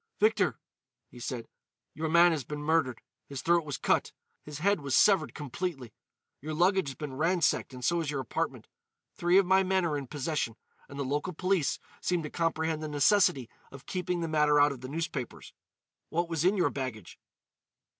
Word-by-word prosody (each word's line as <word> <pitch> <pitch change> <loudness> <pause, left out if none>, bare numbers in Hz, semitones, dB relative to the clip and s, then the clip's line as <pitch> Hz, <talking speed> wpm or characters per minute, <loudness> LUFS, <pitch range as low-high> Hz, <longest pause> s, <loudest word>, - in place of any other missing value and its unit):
"Victor," 215 -3 +2 0.5
he 125 - -12
said, 120 -1 -5 0.5
"your 160 +2 -3
man 170 +2 +6
has 155 -4 -1
been 150 +4 -6
murdered. 150 -6 +1 0.3
His 140 -2 -6
throat 170 0 +3
was 145 -3 -4
cut; - - +1 0.3
his 150 -1 -8
head 200 +5 +2
was 140 -2 0
severed 190 -7 +4
completely. 145 -3 -5 0.5
Your 155 +2 -4
luggage 185 +1 +3
has 135 - -7
been 145 0 -6
ransacked 165 0 +1
and 125 -1 -6
so 170 0 +2
has 160 -4 -2
your 145 -2 -2
apartment. 130 - -3 0.5
Three 175 +2 +3
of 195 - +5
my 190 +1 +4
men 190 -1 +1
are 150 -3 0
in 135 - -8
possession, 145 -4 -2 0.3
and 140 - -9
the 140 - -2
local 145 +7 -2
police 185 -2 0 0.2
seem 175 -2 0
to 150 - -6
comprehend 160 -1 -1
the 155 - -3
necessity 145 - +3 0.2
of 135 -1 -12
keeping 180 -1 -2
the 165 - -1
matter 150 -2 +3
out 145 0 +5
of 130 -3 -8
the 130 - -7
newspapers. 150 -5 -5 0.6
What 170 +1 0
was 165 -2 -1
in 190 +3 +3
your 180 - +2
baggage?" 130 -8 -6
155 Hz, 185 wpm, -29 LUFS, 140-175 Hz, 0.6 s, man